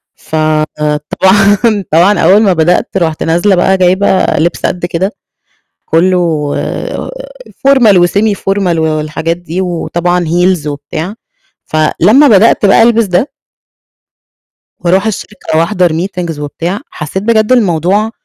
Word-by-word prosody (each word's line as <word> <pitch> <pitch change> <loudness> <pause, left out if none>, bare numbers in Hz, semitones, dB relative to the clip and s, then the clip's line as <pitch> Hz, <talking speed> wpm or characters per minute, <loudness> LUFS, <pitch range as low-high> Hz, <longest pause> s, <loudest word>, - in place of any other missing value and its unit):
فطبعًا 160 +7 0
طبعًا 180 +6 +3
أول 205 +3 +4
ما 195 -4 +3
بدأت 175 +2 +1
رُحت 160 -4 -1
نازلة 175 +4 +1
بقى 190 +2 +2
جايبة 185 +1 +2
لِبس 170 +3 -1
قد 175 -1 -2
كده، 180 +3 -2 0.7
كلّه 165 -4 0 1.1
formal 245 -7 +5
وsemi-formal 195 -3 -1
و - - 0
والحاجات 155 +1 -2
دي 175 +1 -5
وطبعًا 175 0 -2
heels 175 -1 0
وبتاع. 155 +5 -5 0.5
فلمّا 185 - +3
بدأت 215 -1 +4
بقى 195 - +4
ألبس 230 -1 +3
ده 190 +8 0 1.5
وأروح 185 +4 +1
الشركة 210 -5 -4
وأحضر 175 +2 +1
meetings 170 -2 -4
وبتاع، 170 - -4
حسيت 155 +6 -5
بجد 220 +1 +1
الموضوع 200 0 +1
180 Hz, 110 wpm, -11 LUFS, 160-200 Hz, 1.5 s, formal